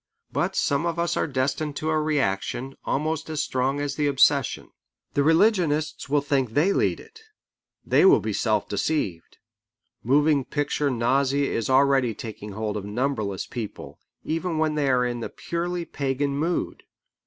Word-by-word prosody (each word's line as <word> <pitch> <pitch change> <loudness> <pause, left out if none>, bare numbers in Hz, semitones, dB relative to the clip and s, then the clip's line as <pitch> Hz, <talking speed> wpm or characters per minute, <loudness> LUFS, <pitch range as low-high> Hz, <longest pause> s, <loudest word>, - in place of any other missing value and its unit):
But - - -1
some 145 +4 +1
of 170 0 -2
us 170 0 0
are - - 0
destined 140 +2 -1
to 155 +2 -2
a 155 0 +1
reaction, 135 -2 -1
almost 155 +2 -1
as 155 -2 -1
strong 130 +2 -1
as 145 -1 -2
the 150 -1 +1
obsession. 140 0 +2 0.4
The 145 - +2
religionists 160 -3 +2
will 145 0 +3
think 135 -5 -1
they 180 +7 +3
lead - - +1
it. 450 0 -15 0.6
They - - +4
will 380 - +7
be - - -3
self - - 0
deceived. 95 - -2 0.7
Moving 145 +3 +3
picture 145 +1 -1
nausea 135 +3 +1
is 115 - -2
already 135 -3 +3
taking 105 -2 -8
hold 105 0 -3
of 100 - -5
numberless 105 -2 -2
people, 115 -4 -7 0.2
even 165 +1 -2
when 155 -1 +1
they 145 -2 0
are 125 -1 +3
in 120 -1 -2
the 115 - -4
purely 175 0 -3
pagan 140 -1 -2
mood. 165 +5 -2
140 Hz, 160 wpm, -25 LUFS, 130-155 Hz, 0.7 s, will